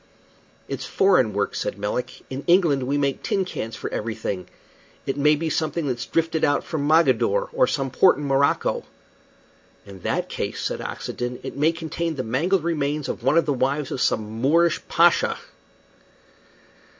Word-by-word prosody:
"It's - - -5
foreign 180 - +3
work," 100 0 -1
said - - -3
Melick. 105 +5 -3
"In 135 +2 -6
England 165 -8 +3
we 140 +2 +1
make 140 -1 0
tin 195 -1 0
cans 115 -10 -5
for - - -5
everything. 110 -4 -4 0.6
It 135 - -1
may 150 +2 +4
be 160 +2 -3
something 160 +1 -1
that's 125 -3 -3
drifted 165 -1 0
out 145 - +2
from 145 -3 -3
Mogadore 170 - +3
or - - +3
some 135 -1 -2
port 185 +8 +5
in 145 - -4
Morocco." 140 0 +1 1.0
"In 100 -1 -11
that - - -1
case," - - -4
said - - -3
Oxenden, 125 0 -5
"it - - -6
may 150 +3 +3
contain 165 0 -3
the 130 - -3
mangled 160 +10 +1
remains 150 -3 -1
of - - -4
one 135 +6 +2
of 165 - +4
the 145 - +1
wives 135 +2 -1
of 130 - -3
some 110 +1 -1
Moorish 165 +4 +3
pasha." 170 +1 +3
145 Hz, 165 wpm, -23 LUFS, 125-165 Hz, 1.0 s, port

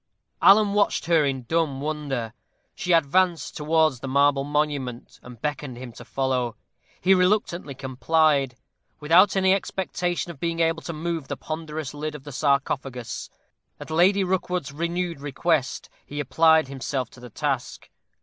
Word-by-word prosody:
Alan 205 0 +6
watched 205 -4 +1
her 165 -2 +4
in 135 -2 -1
dumb 155 0 0
wonder. 140 -6 -3 0.4
She 180 - -3
advanced 170 +2 +2
towards 155 -3 +2
the 135 - -6
marble 140 +1 +3
monument, 145 -4 -2
and 125 -2 -12
beckoned 145 -2 -4
him 125 -1 -8
to 115 - -12
follow. 130 -3 -1 0.4
He 190 +2 +4
reluctantly 180 -6 +1
complied. 135 0 +1 0.4
Without 170 +8 +5
any 190 -1 +4
expectation 180 -2 -2
of 140 - -14
being 170 +1 -2
able 165 0 +1
to 170 - -5
move 160 -2 -3
the - - -4
ponderous 155 -2 -5
lid 150 +1 -4
of 140 - -9
the 145 - -9
sarcophagus, 135 -3 -1 0.5
at - - -9
Lady 190 +5 +4
Rookwood's 180 -5 -1
renewed 170 +1 -3
request 145 0 -1 0.2
he 145 - -7
applied 160 +1 +4
himself 130 -2 -4
to - - -15
the 125 0 -10
task. 135 0 -3
150 Hz, 150 wpm, -24 LUFS, 135-170 Hz, 0.5 s, Alan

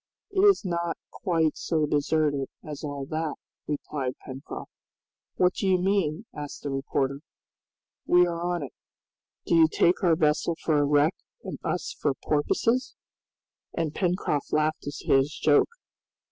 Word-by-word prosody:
"It 390 - -1
is 400 - +5
not 170 -1 -1
quite 165 -4 0
so 155 -2 0
deserted 145 -1 +1
as 150 -1 -7
all 145 -2 -4
that," 155 0 -2 0.3
replied 140 -3 -3
Pencroft. 135 +1 -8 0.6
"What 180 0 +3
do 195 - -2
you 185 -1 +4
mean?" 185 -1 0
asked 145 -1 -7
the 145 - -3
reporter. 135 0 -1 0.9
"We 180 0 +6
are 170 -1 -3
on 175 -2 -1
it. 135 - -8 0.7
Do - - 0
you 165 -1 +7
take 175 +4 +2
our 170 -3 +5
vessel 155 +1 +1
for 155 -2 +3
a 145 - +3
wreck 145 +4 +3 0.3
and - - -6
us - - -2
for 145 -3 +1
porpoises?" 230 - 0 0.8
And 160 -3 -1
Pencroft 175 -6 -1
laughed 155 -1 0
at 145 - -6
his 135 +2 +3
joke. 145 -2 +4
155 Hz, 145 wpm, -27 LUFS, 145-175 Hz, 0.9 s, you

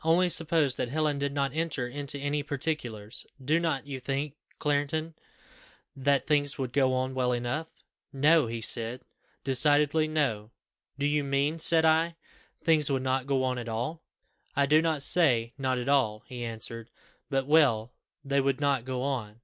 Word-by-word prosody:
Only 170 +3 +3
suppose 160 -5 +2
that 120 - -2
Helen 150 0 0
did 140 0 -1
not 140 -2 -1
enter 155 -6 -2
into 140 +2 -3
any 145 +1 -2
particulars, 135 -7 -4 0.2
do 150 +5 +1
not 160 -6 -1
you 140 -2 -6
think, 135 +3 -3 0.2
Clarendon, 150 +2 -1 0.8
that 140 0 +1
things 145 -2 +1
would 130 -3 -4
go 135 -2 +3
on 130 +1 -2
well 125 -1 0
enough?' 125 +7 -2 0.4
'No,' 150 +1 +3
he 115 0 -5
said 115 +2 +1 0.4
decidedly, 145 +3 +3
'no.' 130 -9 -1 0.5
'Do 140 - -1
you 145 0 +1
mean,' 140 +3 0
said 160 0 +6
I, 165 +1 +2 0.4
'that - - -33
things 155 -3 +4
would 135 -2 0
not 130 0 -1
go 135 -2 +1
on 130 -1 -1
at 120 -1 -6
all?' 125 +9 -3 0.5
'I 140 - +3
do 155 +3 +4
not 160 -4 0
say, 125 -9 +3
not 130 -1 0
at 125 0 -4
all,' 125 -7 +1
he 125 -2 -7
answered; 115 0 -6 0.4
'but 135 -2 0
well 130 -7 +3 0.3
they 140 0 +1
would 135 0 0
not 140 -4 0
go 130 -1 -3
on. 120 -6 -4
140 Hz, 175 wpm, -28 LUFS, 125-150 Hz, 0.8 s, said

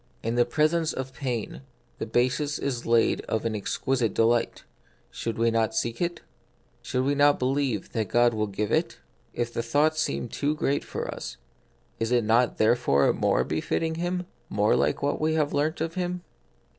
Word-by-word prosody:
In 115 - -1
the 120 0 +3
presence 155 +5 +1
of 130 0 -5
pain 125 -5 -4 0.4
the - - -3
basis 130 +6 +1
is 125 -4 -3
laid 115 -1 +3
of 110 - -2
an 110 -1 -1
exquisite 115 +2 -1
delight; 115 +1 +2 0.5
should 115 -1 -4
we 115 0 +2
not 115 +6 +1
seek 120 -6 -1
it? 175 0 -1 0.6
Should 130 0 -1
we 140 +2 +2
not 145 0 +4
believe 130 -5 -1
that 110 -2 -1
God 120 0 +4
will 105 -1 -1
give 100 +1 -3
it? - - 0 0.4
If 120 0 -2
the - - -1
thought 145 +7 +2
seems 125 -6 -2
too 145 +1 0
great 140 -2 0
for - - -5
us, - - -7 0.6
is 115 +1 -1
it 120 -2 +3
not 115 +3 +2
therefore 110 - +3
more - - +2
befitting 160 - -1
Him, 175 +2 -2 0.2
more 105 +1 +2
like 75 - +1
what 145 +1 0
we 160 +1 +1
have 150 -2 +1
learnt 155 +3 0
of 165 0 -2
Him 180 -1 -3
125 Hz, 180 wpm, -26 LUFS, 115-150 Hz, 0.6 s, not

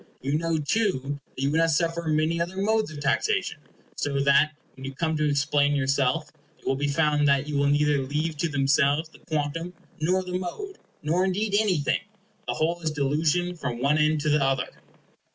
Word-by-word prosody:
You 140 +3 -1
know, 165 -1 0
too, 145 - -1 0.2
that 130 - -4
you 140 - +1
would 160 - +2
not 165 0 +3
suffer 165 +1 0
many 155 +2 +1
other 175 +3 -3
modes 215 +1 +1
of 155 -1 -8
taxation, 400 - 0 0.4
so 140 -1 -1
that, 140 +2 +4 0.2
when 135 - -10
you 135 0 -6
come 160 +2 -1
to 150 -1 +1
explain 145 0 +2
yourself, 140 +2 0 0.3
it - - -26
will 135 - +1
be 145 +2 -1
found 150 0 +2
that 140 0 +2
you 150 - -3
will 140 0 +2
neither 145 0 +3
leave 150 +4 -2
to 165 +3 0
themselves 145 +2 +2
the - - -18
quantum 160 +3 -3 0.2
nor 180 +4 +1
the 180 0 -3
mode, 385 - -6 0.2
nor 165 +5 +1
indeed 200 +2 -1
anything. 195 -9 +2 0.5
The - - -1
whole 170 +2 0
is 160 - 0
delusion 155 +5 0
from 125 -7 -4
one 140 +4 +2
end 155 0 +2
to 150 - 0
the 150 -1 +3
other. 135 -1 0
150 Hz, 195 wpm, -26 LUFS, 140-170 Hz, 0.5 s, that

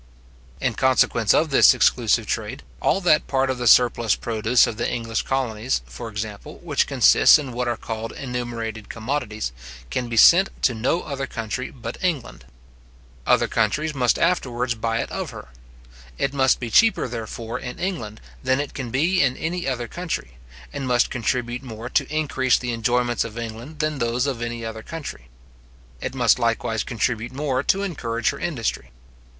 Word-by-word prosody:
In - - 0
consequence - - +3
of - - +3
this - - +7
exclusive - - +3
trade, - - -4 0.2
all 195 - +2
that 160 -4 +3
part 135 -1 +1
of 130 - -4
the 120 - 0
surplus 120 -3 +5
produce 115 +1 +2
of 110 - -5
the 120 - -1
English 115 -2 -2
colonies, 125 - -1
for - - -8
example, 105 -1 -6
which - - +1
consists - - +6
in 140 -4 -5
what 125 +1 -2
are 120 -1 -1
called 115 0 -5
enumerated 120 -4 -5
commodities, 110 - -3 0.4
can 120 - -2
be 115 - -3
sent 185 - +7
to 125 - +4
no 125 +10 0
other 140 -2 -4
country 115 +2 -4
but 115 +2 -8
England. 160 -9 -2 0.8
Other - - +4
countries 145 +8 0
must 125 -4 +2
afterwards 125 -8 0
buy 115 0 -1
it - - -6
of - - -4
her. - - -10 0.7
It 140 - -1
must 135 -1 +3
be 120 -2 -5
cheaper, 225 - +4
therefore, 115 0 -5
in 125 -1 -7
England 170 - -4 0.2
than 130 +1 +1
it 145 -1 -3
can 130 -4 -5
be 165 +10 +2
in 130 -2 +2
any 175 +1 -3
other 125 -3 -2
country, 155 - -5 0.4
and 135 - -4
must 125 -1 +2
contribute 120 0 -2
more 120 -2 -7
to 140 0 +1
increase 135 -5 +1
the 120 -1 -3
enjoyments 120 +1 +1
of 115 -1 -8
England 115 +6 -7
than 155 -1 -1
those 115 +2 0
of 130 -5 -2
any 120 -1 -4
other 110 0 -6
country. 140 - -8 0.7
It - - -4
must 120 -2 +3
likewise 115 -2 0
contribute 120 0 -2
more 135 -2 -1
to 195 +7 +1
encourage 120 - -1
her 140 - -9
industry. 135 -10 -3
120 Hz, 170 wpm, -23 LUFS, 115-140 Hz, 0.8 s, this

